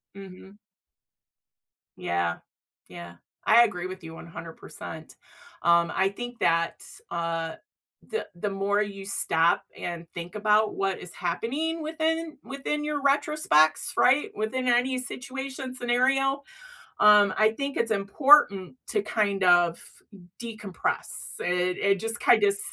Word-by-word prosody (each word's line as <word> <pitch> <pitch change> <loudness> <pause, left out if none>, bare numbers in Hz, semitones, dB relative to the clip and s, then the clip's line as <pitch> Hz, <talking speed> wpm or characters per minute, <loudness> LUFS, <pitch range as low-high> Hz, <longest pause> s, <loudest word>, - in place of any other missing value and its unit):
Mhm. 195 +1 -12 1.4
Yeah. 85 -1 -1 0.5
Yeah. 85 0 -10 0.3
I 235 - +7
agree 185 -5 -2
with 185 -1 -9
you 160 0 -9
100%. 165 -1 -10 0.5
Um, 170 0 +3
I 190 0 +2
think 245 +4 -8
that's 165 0 -1
uh, 165 -1 -2 0.5
the 445 - -4
the 200 +4 -3
more 200 +1 0
you 200 -2 -5
stop 165 -4 +2
and 170 -1 -5
think 175 +3 -7
about 210 +1 +2
what 195 -1 -1
is 180 - -10
happening 280 - -2
within 320 0 -2
within 280 +2 -3
your 300 -1 -2
retrospect's, 275 - +2
right, 270 +4 +4
within 250 +4 -2
any 250 +1 +2
situation 265 0 -6
scenario, 270 +3 +1 0.6
um, 210 -2 +6
I 215 0 +4
think 280 0 -3
it's 230 - 0
important 205 - +4
to 420 - 0
kind 200 - -1
of 175 -1 +4 0.6
decompress. 215 -5 -4 0.3
It 180 0 0
it 195 -1 +2
just 225 +1 -3
kind 225 -4 +5
of, 205 - +5
s - - -5
210 Hz, 125 wpm, -26 LUFS, 175-260 Hz, 1.4 s, I